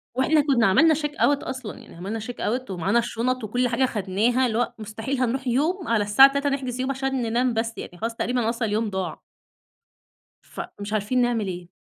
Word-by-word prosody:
وإحنا 295 +4 +3
كنا 265 -7 +3
عملنا 315 +12 +5
check 295 -1 -2
out 285 0 +3
أصلًا، 260 -4 -6
يعني - - -14
عملنا 200 +6 -4
check 245 +3 -6
out 250 +2 -2
ومعانا 190 +5 +1
الشنط 240 +1 -1
وكل 245 +4 0
حاجة 245 +2 0
أخدناها، 225 +3 +1
اللي 225 -1 -1
هو 245 - 0
مستحيل 220 +5 -4
هنروح 255 +2 -1
يوم 320 +9 0
على 225 -3 +2
الساعة 265 +7 +7
15:00 280 +1 0
نحجز 255 -3 -3
يوم 260 +1 0
عشان 270 -1 -2
ننام 240 +2 +1
بس، 225 +1 -1
يعني 175 - -8
خلاص 230 +3 -3
تقريبا 245 -2 0
أصلًا 230 -1 -1
اليوم 215 +1 0
ضاع. 190 -4 -4 1.2
فمش 205 +1 -7
عارفين 215 +4 +1
نعمل 235 -4 +1
إيه؟ 175 -1 -6
240 Hz, 195 wpm, -24 LUFS, 215-260 Hz, 1.2 s, الساعة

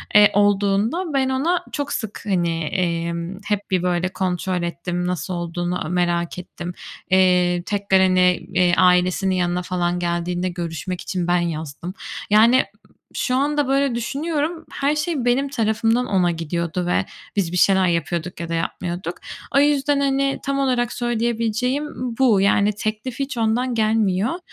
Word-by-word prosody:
eee, 210 0 +8
olduğunda, 205 - +2
ben 265 -1 +2
ona 310 +7 0
çok 285 -1 -3
sık, 220 -3 -4
hani, 170 -5 0
emm, 170 +1 -2
hep 205 -2 -2
bir 185 -2 +1
böyle 180 0 0
kontrol 185 -1 -2
ettim. 175 +1 -3
Nasıl 180 0 -3
olduğunu 175 +1 -3
a - - -4
merak 175 -1 0
ettim. 175 0 -7 0.4
Eee, 180 -1 +3
tekrar 200 -2 +2
hani, 185 -1 +3 0.3
eee, 180 -1 +3
ailesinin 185 +1 +3
yanına 180 0 0
falan 175 -1 -1
geldiğinde 175 +1 -1
görüşmek 175 0 -5
için 180 -2 -3
ben 175 0 +3
yazdım. 165 +1 -4 0.4
Yani, 225 +5 +5 0.5
şu 250 - 0
anda 290 +1 +1
böyle 275 -2 +1
düşünüyorum. 305 +6 -2
Her 280 +2 0
şey 300 -4 -1
benim 265 +3 +2
tarafımdan 225 -1 +1
ona 185 -6 +2
gidiyordu 170 +2 -3
ve 175 - +1 0.3
biz 190 -5 0
bir 180 - -1
şeyler 190 0 +4
yapıyorduk 170 +1 -2
ya 170 -1 -5
da - - -2
yapmıyorduk. 175 +1 -3 0.4
O 275 - +7
yüzden, 290 0 +3
hani, 275 0 +1
tam 275 0 0
olarak 245 -3 +1
söyleyebileceğim 240 +3 -1 0.3
bu. 230 -7 +4
Yani 200 +1 +3
teklif 215 +4 -4
hiç 275 -2 -3
ondan 235 +3 +1
gelmiyor 220 - +1
195 Hz, 150 wpm, -21 LUFS, 175-245 Hz, 0.5 s, eee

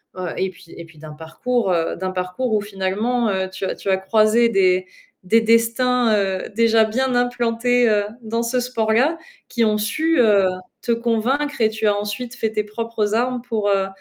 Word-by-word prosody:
heu, 185 -1 -4
et 190 - 0
puis 180 -2 -16
et 170 - -8
puis 160 -1 -19
d'un 155 -1 -10
parcours, 190 +7 -2
heu, 165 -1 -1
d'un 185 +1 -4
parcours 185 +6 -3
où 210 - +2
finalement, 210 +4 -1
heu, 190 -1 -1
tu 190 +1 -5
as - - -3
tu 195 - -5
as 190 - +3
croisé 215 +4 +3
des 185 -3 +2 0.4
des 225 +5 +3
destins, 230 +1 +2
heu, 195 -2 -1
déjà 225 -1 +4
bien 255 +4 -1
implantés, 245 0 +1
heu, 205 -1 +2 0.2
dans 230 +1 -2
ce 250 +2 0
sport-là, 245 +5 +1 0.3
qui 235 -2 0
ont 210 -1 +1
su, 315 +9 0
heu, 205 -5 +4 0.3
te 235 - -2
convaincre 240 +5 -1
et 220 - +4
tu 215 0 -2
as 205 - +3
ensuite 210 +5 -5
fait 220 -1 -2
tes 215 -1 -1
propres 215 0 -3
armes 245 +1 0
pour, 220 -4 -1
heu, 195 -1 +1
220 Hz, 195 wpm, -20 LUFS, 195-240 Hz, 0.4 s, déjà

